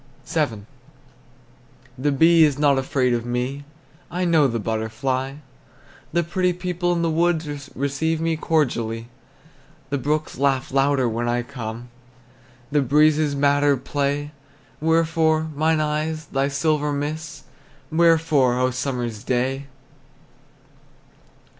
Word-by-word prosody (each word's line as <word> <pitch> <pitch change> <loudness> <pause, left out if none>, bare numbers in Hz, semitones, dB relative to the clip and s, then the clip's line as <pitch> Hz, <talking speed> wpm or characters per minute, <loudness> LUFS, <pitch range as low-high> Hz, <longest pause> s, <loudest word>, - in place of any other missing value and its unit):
VII. 115 -11 -1 1.3
The 140 +3 0
bee 165 +4 +5
is 145 -3 +3
not 145 -2 +3
afraid 130 -1 +1
of 120 -1 -1
me, 125 +4 -3 0.4
I 180 +1 -2
know 160 -4 +4
the 115 -2 -2
butterfly; 115 +5 -2 0.8
The 170 +1 +1
pretty 180 +2 0
people 175 0 -2
in 170 -1 -1
the 165 - +1
woods 155 -4 -1
Receive 140 +4 -1
me 165 0 0
cordially. 120 -8 -1 0.8
The 140 - 0
brooks 150 0 -2
laugh 135 -1 +1
louder 135 -1 +2
when 120 +1 -1
I 120 0 0
come, 120 -1 -7 0.8
The 145 0 +3
breezes 150 +2 +3
madder 145 0 +3
play. 145 +2 -2 0.5
Wherefore, 160 0 +2
mine 160 +2 +2
eyes, 155 +1 -2
thy 135 0 0
silver 150 +1 0
mists? 150 +2 -4 0.5
Wherefore, 160 -6 +3
O 130 0 +2
summer's 125 -4 -3
day? 130 +2 -1
145 Hz, 115 wpm, -22 LUFS, 130-160 Hz, 1.3 s, bee